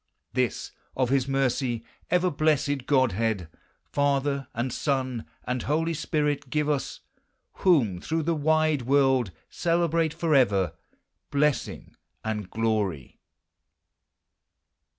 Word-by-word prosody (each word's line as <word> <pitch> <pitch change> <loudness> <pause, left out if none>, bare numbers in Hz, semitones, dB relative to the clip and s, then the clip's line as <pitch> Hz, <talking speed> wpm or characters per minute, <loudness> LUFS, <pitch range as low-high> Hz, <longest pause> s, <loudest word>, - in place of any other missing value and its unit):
L23 - - -50
This, 125 -2 -1 0.3
of 130 -2 +2
his 135 -1 +2
mercy, 130 -3 0 0.3
ever 180 0 +2
blessed 145 -3 +1
Godhead, 115 - +1 0.4
Father, 140 -1 0
and 120 +1 -2
Son, 130 -5 -1 0.2
and 125 0 -2
Boly 165 +3 +1
Spirit, 150 -3 -1
give 150 +2 0
ns, 145 -3 -2 0.2
— - - -49
Whom 120 - +3
through 160 0 -1
the 170 +2 +1
wide 155 -1 +2
world 130 -3 +3 0.2
celebrate 165 -2 +1
forever 125 - +2 0.6
Blessing 145 0 -1 0.3
and 105 -3 -3
glory 105 - -1
135 Hz, 110 wpm, -26 LUFS, 120-150 Hz, 0.6 s, Whom